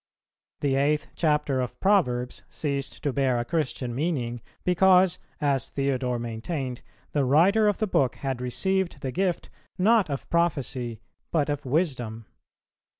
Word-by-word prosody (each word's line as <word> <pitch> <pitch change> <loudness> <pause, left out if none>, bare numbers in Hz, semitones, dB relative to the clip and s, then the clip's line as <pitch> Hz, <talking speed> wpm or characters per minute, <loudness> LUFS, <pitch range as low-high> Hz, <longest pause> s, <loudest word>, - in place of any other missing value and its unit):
The 140 -2 +1
eighth 145 +3 +1
chapter 150 -4 +1
of 125 - -5
Proverbs 125 -12 +1
ceased 140 -3 -3
to 145 - 0
bear 130 -2 +2
a 120 - -1
Christian 135 -5 -2
meaning, 125 -5 -2 0.2
because, 180 0 +4 0.2
as 140 -5 0
Theodore 130 -3 -1
maintained, 120 +3 -4 0.3
the 145 - +1
writer 180 +11 +4
of 205 - +2
the 215 - +1
book 135 - +1
had 135 -3 -3
received 185 +5 -1
the 130 - -3
gift, 180 +3 -1 0.3
not 210 -1 +4
of 140 -1 -4
prophecy, 135 -8 0 0.3
but 150 -3 +1
of 145 0 -4
wisdom. 125 -7 -1
140 Hz, 140 wpm, -26 LUFS, 125-170 Hz, 0.3 s, because